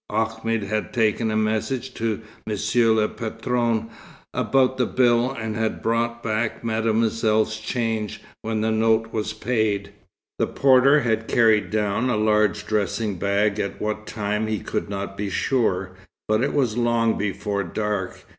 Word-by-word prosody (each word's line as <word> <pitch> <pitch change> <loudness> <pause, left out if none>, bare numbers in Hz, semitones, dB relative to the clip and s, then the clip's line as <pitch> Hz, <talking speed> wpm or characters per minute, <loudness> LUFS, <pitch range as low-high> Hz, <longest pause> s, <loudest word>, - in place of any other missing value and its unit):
Ahmed 115 0 -1
had 105 +2 -2
taken 110 0 +1
a 110 - 0
message 110 +4 -1
to 115 -1 -2 0.3
Monsieur 110 +2 +2
le 110 -1 +3
Patron, 115 0 -2 0.4
about 130 -1 +2
the 125 - +2
bill, 120 -1 +3
and 110 -4 -4
had 110 0 -2
brought 115 +1 0
back 110 +1 -1
Mademoiselle's 110 -1 +1
change, 110 -2 -2 0.2
when 110 -1 -2
the 110 +1 +1
note 110 0 +2
was 110 0 -2
paid. 110 -5 -1 0.5
The - - +2
porter 135 +2 +5
had 115 -2 0
carried 110 -5 +3
down 105 +4 0
a 115 - +1
large 105 -1 +2
dressing 105 -2 -1
bag, 100 +2 +1
at 100 - -3
what 110 0 -3
time 105 0 -2
he 110 0 -1
could - - -3
not 100 -1 -4
be 100 -1 -2
sure, 95 -5 0 0.4
but 110 +2 +2
it 140 - 0
was 125 -6 +1
long 115 -1 +2
before 100 0 -2
dark. 100 +1 -3
110 Hz, 150 wpm, -23 LUFS, 105-115 Hz, 0.5 s, porter